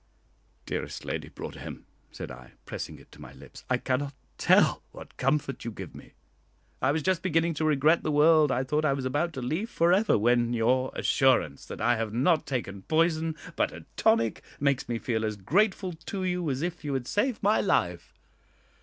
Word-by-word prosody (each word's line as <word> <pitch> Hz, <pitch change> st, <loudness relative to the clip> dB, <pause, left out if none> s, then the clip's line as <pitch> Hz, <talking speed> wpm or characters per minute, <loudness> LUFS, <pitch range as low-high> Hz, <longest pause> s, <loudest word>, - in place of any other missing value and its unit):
"Dearest -, -, -5 dB
Lady -, -, -4 dB
Broadhem," -, -, -8 dB, 0.3 s
said -, -, -7 dB
I, 65 Hz, -1 st, -12 dB
pressing -, -, -6 dB
it -, -, -19 dB
to -, -, -15 dB
my 65 Hz, -, -11 dB
lips, 70 Hz, 0 st, -13 dB
"I 125 Hz, -, +3 dB
cannot 130 Hz, +2 st, -2 dB, 0.2 s
tell -, -, +4 dB
what -, -, -12 dB
comfort 135 Hz, 0 st, -1 dB
you 115 Hz, -, -3 dB
give 110 Hz, -, -8 dB
me. -, -, -13 dB, 0.7 s
I 130 Hz, -, +3 dB
was 155 Hz, +1 st, -1 dB
just 185 Hz, 0 st, +1 dB
beginning 165 Hz, -2 st, +1 dB
to 155 Hz, +1 st, -1 dB
regret 155 Hz, +2 st, +3 dB
the 155 Hz, -, -1 dB
world 150 Hz, 0 st, +5 dB
I 130 Hz, +1 st, +1 dB
thought 150 Hz, +4 st, 0 dB
I 145 Hz, -3 st, +3 dB
was 135 Hz, -1 st, -3 dB
about 145 Hz, +6 st, 0 dB
to 130 Hz, -3 st, -5 dB
leave 165 Hz, -, -2 dB
for 170 Hz, -5 st, +3 dB
ever, 205 Hz, +3 st, +3 dB
when 120 Hz, +2 st, +2 dB
your 125 Hz, +3 st, +2 dB
assurance 125 Hz, -, +2 dB
that -, -, -7 dB
I 120 Hz, -, +3 dB
have 110 Hz, -1 st, -3 dB
not 155 Hz, +5 st, +2 dB
taken 100 Hz, -7 st, -3 dB
poison, 160 Hz, -, +1 dB, 0.2 s
but -, -, +1 dB
a -, -, -11 dB
tonic, 115 Hz, -1 st, +2 dB, 0.2 s
makes 140 Hz, -3 st, 0 dB
me 120 Hz, -, 0 dB
feel 110 Hz, -1 st, -2 dB
as 110 Hz, -1 st, -1 dB
grateful 185 Hz, -, +1 dB
to 190 Hz, +4 st, -6 dB
you 180 Hz, -3 st, -1 dB
as 135 Hz, +2 st, -2 dB
if 175 Hz, -1 st, -4 dB
you 145 Hz, -2 st, -2 dB
had 130 Hz, -2 st, -2 dB
saved 230 Hz, +1 st, 0 dB
my 210 Hz, +2 st, +4 dB
life. -, -, -1 dB
140 Hz, 195 wpm, -28 LUFS, 120-165 Hz, 0.7 s, world